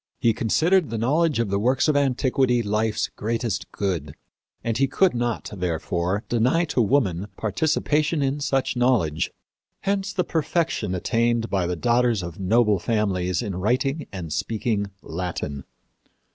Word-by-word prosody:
He 115 - +3
considered 160 - +2
the 115 - -3
knowledge 150 +7 +2
of 115 -4 0
the 100 - +1
works 130 +6 +2
of 150 - +2
antiquity 130 -2 +2
life's 105 +1 0
greatest 115 0 -2
good, 85 -8 -3 0.5
and 115 -1 -1
he 135 - +4
could 190 +7 +3
not, 120 -1 -2
therefore, 90 +2 -1
deny 125 +9 +2
to 125 - +2
woman 105 -6 +1
participation 150 - +1
in 135 +2 0
such 135 -3 0
knowledge. 115 -12 +2 0.5
Hence 195 0 -1
the 180 - 0
perfection 160 - -1
attained 115 +4 0
by 95 -3 +1
the 90 - -1
daughters 120 +2 +2
of 85 0 -7
noble 105 +1 +3
families 95 -2 0
in 100 -5 -4
writing 130 - 0
and 85 -5 -5
speaking 105 +1 -1
Latin." 80 -5 -4
115 Hz, 145 wpm, -24 LUFS, 95-135 Hz, 0.5 s, he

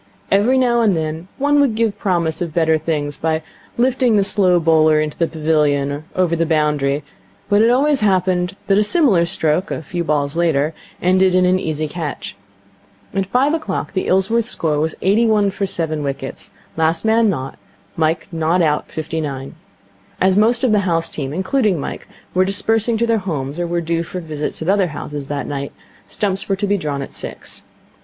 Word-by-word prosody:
Every 215 +7 +3
now 240 -2 +3
and 205 -6 +3
then 160 +2 -4
one 290 +1 +2
would 260 -6 +2
give 225 -2 0
promise 170 -4 0
of 170 -3 -4
better 160 -2 +3
things 145 -3 -2
by 160 0 -1 0.3
lifting 250 -1 +2
the 200 - +4
slow 190 -3 +3
bowler 155 -1 +4
into 155 -1 -2
the 165 - 0
pavilion 150 -3 +1
or 145 +2 -6
over 180 -2 +2
the 165 0 0
boundary, 150 -2 +1 0.5
but 205 +1 +4
it 225 - +5
always 275 +2 +2
happened 185 -2 +1
that 195 0 +3
a - - +4
similar 210 - +3
stroke, 170 +3 0
a - - -4
few 175 +4 -3
balls 145 -2 0
later, 160 -3 +1 0.3
ended 185 +1 +3
in 185 0 +4
an 185 +1 +3
easy 155 -2 -2
catch. 145 - -5 0.8
At 195 -1 -1
five 260 +8 +2
o'clock 320 -7 -3
the 190 - -1
Ilsworth 200 +5 +2
score 155 -10 -1
was 160 +1 -1
eighty 215 +5 +3
one 210 -2 +2
for 195 0 -2
seven 160 -4 -2
wickets, 135 -1 -5 0.3
last 160 +3 +1
man 220 0 +4
nought, 135 -7 -4 0.4
Mike 160 0 0
not 165 +2 +1
out 150 -2 0
fifty 160 +1 -3
nine. 135 -3 -5 0.7
As 190 0 +3
most 230 +4 +3
of 255 - +3
the 210 - +4
house 165 -4 0
team, 135 -3 -4
including 190 - 0
Mike, - - -6 0.3
were 185 - +3
dispersing 220 +4 +1
to 235 - +1
their 230 -1 +1
homes 150 -5 -4
or 175 - -1
were 170 0 -1
due 165 0 -1
for 175 +2 -6
visits 155 -2 -4
at - - -6
other 195 -1 +3
houses 145 -2 -6
that 145 -1 -3
night, 140 -1 -4 0.4
stumps 195 -1 -2
were 195 - +2
to 200 +2 -2
be 205 0 +1
drawn 145 -5 -3
at - - -10
six. - - -6
175 Hz, 195 wpm, -19 LUFS, 155-205 Hz, 0.8 s, it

